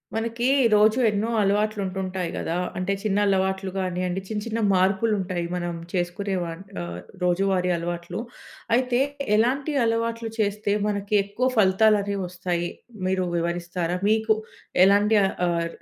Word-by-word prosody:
మనకి, 230 Hz, +2 st, -2 dB, 0.3 s
రోజు 215 Hz, +4 st, +5 dB
ఎన్నో 210 Hz, +2 st, -1 dB
అలవాట్లు 210 Hz, +1 st, +1 dB
ఉంటుంటాయి 185 Hz, -1 st, -3 dB
కదా! 165 Hz, +2 st, -2 dB, 0.2 s
అంటే, 185 Hz, +2 st, -1 dB
చిన్న 205 Hz, -2 st, 0 dB
అలవాట్లు 190 Hz, 0 st, 0 dB
కానీయండి, 185 Hz, 0 st, -2 dB
చిన్న, 210 Hz, 0 st, -3 dB
చిన్న 230 Hz, 0 st, -2 dB
మార్పులు 190 Hz, +4 st, +2 dB
ఉంటాయి. 180 Hz, -2 st, -2 dB
మనం 175 Hz, -1 st, -3 dB, 0.2 s
చేసుకునేవాట్ 180 Hz, -1 st, -2 dB, 0.2 s
ఆహ్, 85 Hz, 0 st, -6 dB, 0.2 s
రోజువారీ 180 Hz, 0 st, +2 dB
అలవాట్లు. 170 Hz, +2 st, -4 dB, 0.6 s
అయితే, 250 Hz, 0 st, +1 dB, 0.4 s
ఎలాంటి 270 Hz, +7 st, +1 dB
అలవాట్లు 230 Hz, 0 st, -1 dB
చేస్తే, 205 Hz, -1 st, 0 dB
మనకి 205 Hz, 0 st, -1 dB
ఎక్కువ 205 Hz, +6 st, -1 dB
ఫలితాలు 210 Hz, +1 st, +5 dB
అనేవి 200 Hz, 0 st, -3 dB
వస్తాయి, 175 Hz, -1 st, -2 dB, 0.4 s
మీరు 185 Hz, -1 st, +1 dB
వివరిస్తారా? 170 Hz, +1 st, -2 dB
మీకు 220 Hz, 0 st, +3 dB, 0.5 s
ఎలాంటి 205 Hz, +2 st, +4 dB, 0.3 s
ఆహ్, 170 Hz, -1 st, 0 dB
195 Hz, 125 wpm, -24 LUFS, 180-215 Hz, 0.6 s, రోజు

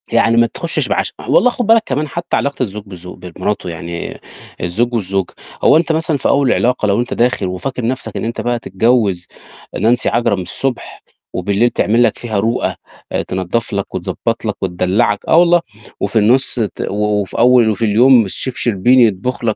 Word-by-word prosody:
يعني 115 Hz, 0 st, +2 dB
ما 115 Hz, 0 st, +5 dB
تخشش 170 Hz, +7 st, -2 dB
بعشم -, -, -1 dB
والله 250 Hz, -, +4 dB
خُد 245 Hz, -1 st, -3 dB
بالك 225 Hz, 0 st, +5 dB
كمان 145 Hz, +3 st, -2 dB
حتى 170 Hz, +4 st, -3 dB
علاقة 140 Hz, -2 st, -1 dB
الزوج 105 Hz, -2 st, -5 dB
بالزوج 90 Hz, -2 st, -11 dB
بمراته 90 Hz, +2 st, -3 dB
يعني 85 Hz, +1 st, -6 dB, 0.4 s
الزوج 115 Hz, +8 st, -1 dB
والزوجة، 95 Hz, -4 st, -2 dB, 0.3 s
هو -, -, +6 dB
أنت 165 Hz, 0 st, +1 dB
مثلًا 160 Hz, -1 st, 0 dB
في -, -, -1 dB
أول 140 Hz, -2 st, +3 dB
العلاقة 125 Hz, -2 st, +1 dB
لو 100 Hz, +2 st, +1 dB
أنت 120 Hz, -, -4 dB
داخِل 120 Hz, -4 st, +1 dB
وفاكر 105 Hz, +7 st, -4 dB
نَفْسك 130 Hz, +2 st, -3 dB
إن -, -, -3 dB
أنت 115 Hz, -, -3 dB
بقى 120 Hz, 0 st, -1 dB
هتتجوّز 105 Hz, -4 st, 0 dB, 0.5 s
نانسي 115 Hz, +4 st, +2 dB
عجرم 110 Hz, -5 st, 0 dB
الصبح 125 Hz, +8 st, -4 dB, 0.3 s
وبالليل 100 Hz, +6 st, +1 dB
تعمل 115 Hz, +1 st, +2 dB
لك -, -, +1 dB
فيها 110 Hz, -4 st, -3 dB
رُؤَة 115 Hz, +4 st, -1 dB, 0.4 s
آآ -, -, -1 dB
تنضف 95 Hz, +5 st, -3 dB
لك 100 Hz, -1 st, -3 dB
وتضبط 115 Hz, +6 st, -3 dB
لك 105 Hz, -, -1 dB
وتدلّعك 95 Hz, +3 st, 0 dB
آه، 170 Hz, +2 st, +6 dB
الله 175 Hz, 0 st, +3 dB, 0.4 s
وفي 105 Hz, +3 st, 0 dB
النُص 125 Hz, +6 st, +2 dB
ت 110 Hz, -3 st, -3 dB
و -, -, -3 dB
و 105 Hz, 0 st, 0 dB
وفي 95 Hz, -, -7 dB
أول 120 Hz, -1 st, +5 dB
وفي 110 Hz, +1 st, -1 dB
اليوم 115 Hz, +1 st, +5 dB
الchef 125 Hz, +6 st, -2 dB
شربيني 120 Hz, +3 st, +4 dB
يطبخ 110 Hz, +5 st, -2 dB
لك 110 Hz, -2 st, 0 dB
115 Hz, 185 wpm, -16 LUFS, 100-125 Hz, 0.5 s, هو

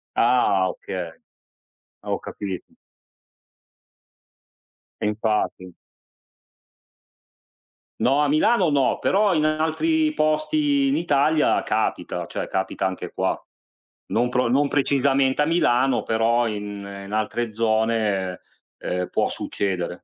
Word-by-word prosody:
Ah, 110 Hz, -6 st, +3 dB
okay. 90 Hz, -2 st, -6 dB, 0.9 s
Ah -, -, -11 dB
ho -, -, 0 dB
capito. 95 Hz, -3 st, -6 dB, 2.4 s
E -, -, 0 dB
infatti. 105 Hz, -4 st, -1 dB, 2.2 s
No 135 Hz, +4 st, +2 dB
a 145 Hz, -, +1 dB
Milano 180 Hz, +4 st, +3 dB
no, 140 Hz, -3 st, +2 dB
però 200 Hz, 0 st, +2 dB
in 155 Hz, -, +2 dB
altri 230 Hz, -, +1 dB
posti 275 Hz, -, +1 dB
in 275 Hz, -, +2 dB
Italia 150 Hz, -1 st, +2 dB
capita, -, -, -2 dB
cioè -, -, -4 dB
capita 95 Hz, 0 st, -2 dB
anche 95 Hz, -1 st, -4 dB
qua. -, -, 0 dB, 0.7 s
Non 120 Hz, +2 st, +1 dB
pro 125 Hz, -1 st, +1 dB
non 140 Hz, +4 st, +2 dB
precisamente 140 Hz, -1 st, +2 dB
a -, -, +3 dB
Milano 135 Hz, -6 st, +2 dB
però 115 Hz, +1 st, +1 dB
in 105 Hz, -1 st, -5 dB, 0.2 s
in 100 Hz, -, -10 dB
altre 110 Hz, +1 st, -2 dB
zone, 110 Hz, -4 st, 0 dB, 0.4 s
ehm, 90 Hz, 0 st, -3 dB
può -, -, 0 dB
succedere. 90 Hz, -3 st, -3 dB
125 Hz, 110 wpm, -23 LUFS, 105-155 Hz, 2.4 s, Ah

